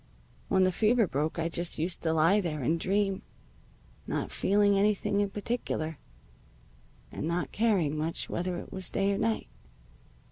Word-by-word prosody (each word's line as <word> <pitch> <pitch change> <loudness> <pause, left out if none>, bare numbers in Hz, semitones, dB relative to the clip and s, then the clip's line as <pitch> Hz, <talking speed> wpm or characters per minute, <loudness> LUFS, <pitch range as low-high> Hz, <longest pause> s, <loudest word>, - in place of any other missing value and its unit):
When 190 - +3
the 185 - +3
fever 220 +4 +3
broke 155 0 -2
I 165 0 0
just 170 +1 -1
used 170 +3 -2
to 160 - +1
lie 165 +6 +4
there 155 -6 -3
and 165 +6 +1
dream, 195 +1 0 0.9
not - - -2
feeling 205 0 +3
anything 205 0 +2
in 200 - 0
particular, 195 - -3 1.1
and 150 - -4
not 170 +1 -1
caring 195 -10 +2
much 160 +2 -2
whether 180 0 -2
it - - -8
was 190 -1 -4
day 195 0 +1
or 195 - -2
night. 225 0 0
185 Hz, 155 wpm, -29 LUFS, 165-205 Hz, 1.1 s, lie